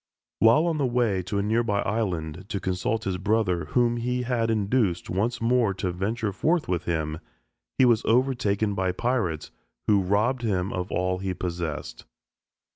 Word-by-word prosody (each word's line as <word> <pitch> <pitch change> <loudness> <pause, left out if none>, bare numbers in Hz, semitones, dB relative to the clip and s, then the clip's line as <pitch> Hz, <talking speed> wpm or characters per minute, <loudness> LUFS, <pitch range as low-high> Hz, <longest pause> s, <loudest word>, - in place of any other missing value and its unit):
While 115 +9 +5
on 165 -3 0
the 140 - +2
way 120 -6 +1
to 100 +3 -3
a 100 - +1
nearby 110 -1 +1
island 90 -5 -2
to 100 -4 -2
consult 95 +4 -1
his 95 -2 -2
brother 95 -4 +1
whom 120 +6 +1
he 125 +1 -1
had 120 -2 0
induced 105 -3 0
once 110 +6 0
more 115 -4 +2
to 95 -1 -2
venture 105 +4 -2
forth 165 - +1
with 90 -1 -1
him, 80 -2 -2 0.6
he 130 - +6
was 120 -3 +4
overtaken 115 -4 +1
by 95 -2 0
pirates 95 -9 -1 0.3
who 105 -2 +4
robbed 105 +7 +1
him 100 -5 -1
of 90 +1 -3
all 90 0 0
he 95 -1 -3
possessed. 85 -5 -4
105 Hz, 165 wpm, -26 LUFS, 90-120 Hz, 0.6 s, he